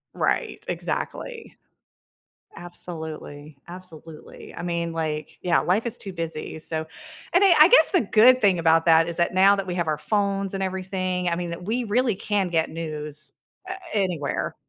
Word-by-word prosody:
Right, - - -1
exactly. 470 -2 -5 1.0
Absolutely, 160 -4 -8
absolutely, 165 -3 -12
I - - -6
mean, 170 -1 -2
like, 155 -2 -4
yeah, 175 -1 +2
life 205 +7 0
is 235 +1 -1
too 195 - -8
busy, 165 -2 -5
so 160 0 -1 0.5
and 360 - +4
I 385 - +6
I 310 - +9
guess - - +7
the 370 - +3
good 240 +4 +5
thing 195 -5 +3
about 165 0 +3
that 165 0 +5
is 170 - -3
that 170 +1 0
now 195 +2 +5
that 195 -1 -4
we 180 - -4
have 170 -2 -1
our 150 -1 -1
phones 200 0 -1
and 195 - -3
everything, 185 -1 -2
I 170 - 0
mean, 175 -1 -4
that 170 +1 -7
we 230 +6 -1
really 230 +2 +1
can 205 -2 -1
get 165 -2 0
news, 150 -3 -5 0.4
uh, 370 - -2 0.2
anywhere. 180 -8 -2
175 Hz, 170 wpm, -24 LUFS, 160-200 Hz, 1.0 s, I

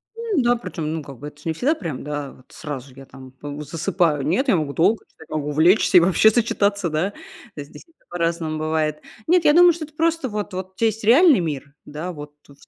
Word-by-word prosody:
М, 455 -9 -1
да, 240 0 +3
причём, 165 -8 -5
ну 160 - -3
как 140 -2 -11
бы 145 - -7
это 150 0 -13
ж - - -20
не 165 - -1
всегда 260 - +1
прям 165 - -6
да, 145 -1 -5
вот 130 - -19
сразу 140 -4 -8
я 135 0 -12
там, 130 -1 -14
п 145 +2 -9
засыпаю. 165 0 0
Нет, 185 - 0
я 245 - +4
могу 150 -4 -2
долго, 205 +9 +2
читать, 160 - -18
могу 150 -1 -3
увлечься 170 +6 +4
и - - +10
вообще 185 +5 +4
зачитаться, 205 -4 0
да. 165 +6 -1 0.4
Здесь 145 -1 -10
это 330 - -32
по-разному 165 -2 -2
бывает. 155 -1 -1 0.3
Нет, 355 0 +4
я 295 - +6
думаю, 350 0 +7
что 320 -1 -6
это 305 - -21
просто 330 -4 0
вот 205 -2 -5
вот 185 0 -6
у - - -49
тя 230 - 0
есть 220 0 -3
реальный 275 - +6
мир, 145 -4 -4
да, 155 +5 -6
вот 150 -3 -10
со 140 - -17
170 Hz, 230 wpm, -21 LUFS, 150-220 Hz, 0.4 s, и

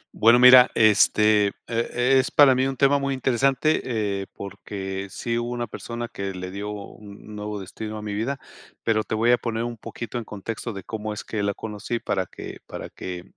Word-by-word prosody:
Bueno, 115 +2 +6
mira, 125 0 +9
este, 105 -1 +5 0.2
eh, 125 +3 +1
es - - -4
para 140 -3 +6
mí 130 +1 +1
un 135 -1 -4
tema 140 0 +4
muy 140 0 -1
interesante, 135 +4 +2
eh, 100 -5 -2
porque 100 0 -6
sí 115 +4 -2
hubo 120 - -3
una 120 -1 -2
persona 120 +1 -6
que 100 -3 -5
le 90 0 -6
dio 100 +2 -5
un 105 0 -10
nuevo 105 0 -5
destino 110 +3 -7
a 105 - -7
mi 105 - -4
vida, 125 +7 -2 0.4
pero, 110 -1 +1
te 110 - -3
voy 115 +2 +3
a 125 - +4
poner 115 -1 -2
un 120 0 -4
poquito 115 +1 -6
en - - -6
contexto 110 +3 -6
de 100 -3 -8
cómo 110 0 -5
es 105 - -6
que 110 - -3
la 100 0 -1
conocí 110 +2 -4
para 95 -4 -2
que - - -9
para - - -7
que 90 -1 -7
110 Hz, 200 wpm, -24 LUFS, 100-120 Hz, 0.4 s, mira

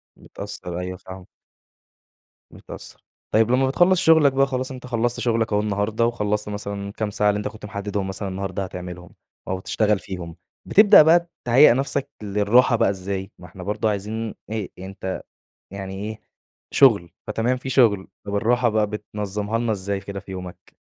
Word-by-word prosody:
متأثّر، 85 -1 -7
أيوه 90 0 -5
فاهمك. 95 0 -11 1.2
متأثّر، - - -11 0.3
طيّب 110 +2 +4
لمّا 130 +1 +3
بتخلّص 175 +6 +4
شُغلك 160 -5 +5
بقى، 135 +1 +3
خلاص 130 0 -3
أنت 125 -1 -8
خلّصت 120 0 0
شغلك 115 -2 0
أهو 105 - +3
النهارده، 105 +2 0
وخلصت 105 -3 -1
مثلًا 100 -1 -5
الكام 105 +1 -3
ساعة 105 0 +2
اللي 105 - +1
أنت 105 - -3
كنت 110 - -9
محدّدهم 100 -1 -3
مثلًا 100 +1 -4
النهارده 95 +1 -3
هتعملهم، 90 -1 -8 0.4
أو 95 - -1
هتشتغل 105 +1 +1
فيهم، 85 -3 -7 0.3
بتبدأ 210 -2 +8
بقى 170 +2 +4 0.2
تهيأ 125 +2 +7
نفسك 135 +1 -1
للراحة 105 +5 +3
بقى 110 - +3
إزاي، 95 0 -4
ما 90 - -12
إحنا 90 +1 -10
برضه 105 +3 0
عايزين 105 +2 -3
إيه 110 -3 -4
أنت 95 0 -5 0.5
يعني 95 -1 -6
إيه، 105 +2 -6 0.5
شغل، 100 - +5 0.2
فتمام 115 +4 0
في 130 +1 -6
شغل، 110 -8 +3 0.2
طَب 100 - -2
الراحة 120 +3 +2
بقى 105 -1 +1
بتنظمّها 105 0 -3
لنا 115 -1 0
إزاي 100 0 -2
كده 100 0 -7
في 95 - -12
يومك؟ 90 -1 -9
105 Hz, 165 wpm, -23 LUFS, 95-120 Hz, 1.2 s, بتبدأ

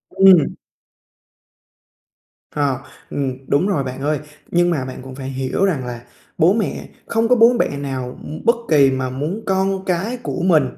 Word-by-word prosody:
Ừm. 190 -6 +6 2.0
Ờ, 140 -4 0 0.3
ừm, 135 -3 -2
đúng 150 +7 +2
rồi 160 -9 0
bạn 130 0 -6
ơi. 150 +1 0 0.3
Nhưng 175 0 +3
mà 150 -7 -1
bạn 130 -1 -7
cũng 130 0 -10
phải 135 -1 -6
hiểu 135 +7 -1
rằng 155 -10 -1
là 120 -1 -6 0.4
bố 170 +5 +5
mẹ 220 -1 -2 0.2
không 225 0 +1
có 250 - +5
bố 230 +1 +6
bẹ - - +2
nào, 130 -3 -4
ưm, 155 +7 -8
bất 235 +1 +5
kỳ 140 -4 +5
mà 130 -1 -2
muốn 150 +11 -3
con 190 0 0
cái 190 +7 -1
của 240 -6 -4
mình 170 -5 +4
150 Hz, 175 wpm, -20 LUFS, 130-190 Hz, 2.0 s, Ừm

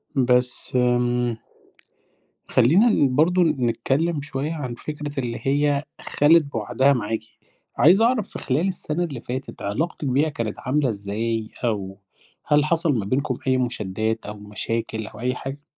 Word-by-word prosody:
بس 125 -1 +2
آمم، 120 -1 +1 1.1
خلّينا 165 - +4
ن 135 -10 +2
برضه 175 +4 +4
نتكلّم 145 +2 0
شوية 150 +2 -3
عن 130 -6 -4
فكرة 145 0 -5
اللي 120 -2 -3
هي 145 +1 +1 0.2
خَلِت 160 +2 +4
بوعدها 130 +1 +1
معاكِ، 110 -2 -2 0.6
عايز 180 +8 +6
أعرف 235 -3 +2
في - - -7
خلال 150 +8 0
السنة 175 -2 -2
اللي 140 -8 -5
فاتت، 130 +2 -6
علاقتِك 145 +9 -2
بيها 140 +5 +2
كانت 115 -7 -4
عاملة 135 0 0
إزاي؟ 110 +2 -3
أو 100 -4 -2 0.5
هل 150 0 +3
حصل 165 -1 +1
ما 100 - -3
بينكم 130 +2 -1
أي 130 0 +3
مشادّات 110 -2 -2
أو 105 - -5
مشاكل 110 +1 -4
أو 105 - -12
أي 125 +1 -1
حاجة؟ 140 +3 -7
130 Hz, 145 wpm, -23 LUFS, 115-150 Hz, 1.1 s, عايز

